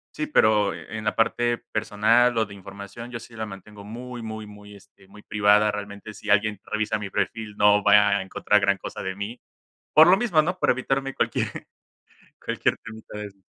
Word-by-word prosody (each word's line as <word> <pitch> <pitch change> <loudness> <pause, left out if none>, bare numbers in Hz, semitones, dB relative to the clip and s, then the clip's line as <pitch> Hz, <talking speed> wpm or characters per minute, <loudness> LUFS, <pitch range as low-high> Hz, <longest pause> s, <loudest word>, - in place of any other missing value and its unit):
Sí, 305 - -3
pero 105 - +3
en 110 -1 -7
la 110 - 0
parte 120 +1 +1
personal 115 +3 +2
o 110 - +2
de 100 - -12
información, 100 +4 -10
yo 120 -1 -6
sí 115 0 -14
la 110 -1 -4
mantengo 100 +1 -11
muy, 120 +3 -8
muy, 110 -1 -6
muy, 105 0 -13
este, 100 -1 -20
muy 105 +2 -16
privada 105 0 +3
realmente, 105 +1 -7
si 105 +1 -10
alguien 105 0 +2
revisa 110 0 -1
mi 100 -1 -5
perfil, 110 +1 -3
no 105 0 +5
va 105 0 +6
a - - -3
encontrar 100 +2 +1
gran 100 0 +2
cosa - - -7
de 95 0 -4
mí, 105 +5 -6 0.5
por 155 +2 +8
lo 185 +2 +6
mismo, 195 -8 +3
¿no?, 180 +4 -3
por - - +2
evitarme 135 +2 -1
cualquier - - 0 1.0
cualquier - - 0
temita 110 -1 -10
de 105 - -5
eso. 100 0 -23
105 Hz, 195 wpm, -24 LUFS, 105-115 Hz, 1.0 s, por